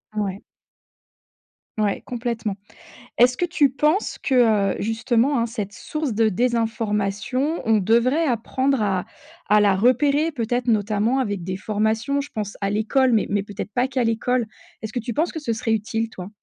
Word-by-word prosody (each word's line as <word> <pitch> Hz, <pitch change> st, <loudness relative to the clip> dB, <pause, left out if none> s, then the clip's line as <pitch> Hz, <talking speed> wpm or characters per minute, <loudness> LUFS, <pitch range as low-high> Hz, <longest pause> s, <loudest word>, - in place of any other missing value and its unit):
Ouais. 200 Hz, -2 st, -3 dB, 1.4 s
Ouais 205 Hz, -2 st, 0 dB
complètement. 230 Hz, -4 st, -3 dB, 0.6 s
Est-ce 250 Hz, +1 st, +5 dB
que 355 Hz, -, 0 dB
tu 315 Hz, -6 st, +2 dB
penses 300 Hz, -, 0 dB
que, 265 Hz, -, -1 dB, 0.4 s
heu, -, -, -5 dB
justement, 240 Hz, +4 st, +1 dB
hein, 235 Hz, -, +1 dB
cette 210 Hz, -4 st, -5 dB
source 305 Hz, -1 st, -4 dB
de 220 Hz, +1 st, +3 dB
désinformation 225 Hz, -, -1 dB
on 225 Hz, -1 st, +3 dB
devrait 235 Hz, -, +2 dB
apprendre 260 Hz, +1 st, 0 dB
à 190 Hz, -3 st, 0 dB, 0.4 s
à 210 Hz, 0 st, +5 dB
la 200 Hz, -2 st, +4 dB
repérer 280 Hz, +8 st, +2 dB
peut-être 245 Hz, -1 st, -2 dB
notamment 215 Hz, +3 st, +1 dB
avec 205 Hz, -7 st, -2 dB
des 185 Hz, 0 st, -3 dB
formations 220 Hz, +6 st, 0 dB
je 285 Hz, +1 st, -7 dB
pense 210 Hz, -2 st, -4 dB
à 195 Hz, -, 0 dB
l'école 240 Hz, +5 st, +2 dB
mais 220 Hz, -, +2 dB
mais 200 Hz, -1 st, 0 dB
peut-être 205 Hz, +1 st, -6 dB
pas 250 Hz, +3 st, +1 dB
qu'à 260 Hz, -1 st, -1 dB
l'école? 230 Hz, +1 st, 0 dB, 0.4 s
Est-ce 220 Hz, -1 st, -5 dB
que -, -, -2 dB
tu 235 Hz, 0 st, -4 dB
penses 320 Hz, +7 st, +1 dB
que -, -, -6 dB
ce 290 Hz, -7 st, -2 dB
serait 225 Hz, 0 st, -1 dB
utile 225 Hz, +1 st, -1 dB
toi? 180 Hz, -2 st, -8 dB
230 Hz, 170 wpm, -22 LUFS, 210-260 Hz, 1.4 s, Est-ce